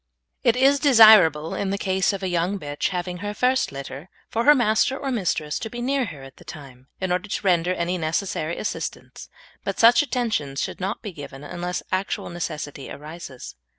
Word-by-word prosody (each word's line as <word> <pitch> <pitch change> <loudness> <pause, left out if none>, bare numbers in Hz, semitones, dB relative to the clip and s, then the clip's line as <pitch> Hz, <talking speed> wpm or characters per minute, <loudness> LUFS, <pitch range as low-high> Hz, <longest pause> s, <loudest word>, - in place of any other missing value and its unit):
It 235 -1 +4
is 275 +2 +4
desirable, 215 - +6
in 200 - -2
the 200 - -1
case 190 -1 +1
of 195 -1 -5
a - - 0
young 180 +3 0
bitch 145 -4 -3
having 180 -1 -4
her 205 +3 -5
first 255 +3 +1
litter, 140 +4 -8 0.2
for 230 +1 0
her 295 +1 +8
master 240 +2 +2
or 275 -1 -3
mistress 175 -9 -1
to 225 - -5
be 240 - -7
near 265 +1 0
her 150 -9 -9
at 135 0 -13
the - - -15
time, 130 -3 -12
in 185 -1 -2
order 180 +3 -1
to 210 - -3
render 175 -1 +3
any 175 +1 -2
necessary 160 0 -2
assistance; 215 - -5 0.3
but - - -4
such 235 +4 +7
attentions 230 - -2
should - - -3
not 195 +6 -3
be 210 - -5
given 145 -3 -10
unless 175 +4 -4
actual 185 -1 -2
necessity 155 -5 -5
arises. 150 -3 -9
185 Hz, 190 wpm, -23 LUFS, 155-220 Hz, 0.3 s, her